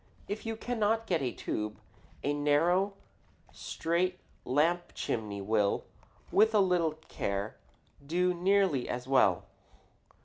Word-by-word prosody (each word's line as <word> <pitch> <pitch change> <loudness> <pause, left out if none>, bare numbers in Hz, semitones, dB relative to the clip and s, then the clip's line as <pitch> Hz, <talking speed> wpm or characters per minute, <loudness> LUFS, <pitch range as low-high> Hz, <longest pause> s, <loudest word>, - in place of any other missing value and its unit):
If 215 +2 -5
you 225 - -2
cannot 225 -1 0
get 170 -7 0
a 125 -3 -1
tube, 105 -1 -4 0.5
a 145 - +1
narrow, 165 +7 +2 0.6
straight 180 +3 -1 0.3
lamp 165 +6 +1
chimney 105 -3 -3
will, 105 0 +1 0.5
with 220 +2 +4
a - - +6
little 180 -5 +2
care, 100 +2 -3 0.5
do 180 +5 +1
nearly 180 -6 +2
as 125 +1 -4
well. 135 0 +4
170 Hz, 115 wpm, -31 LUFS, 130-195 Hz, 0.6 s, a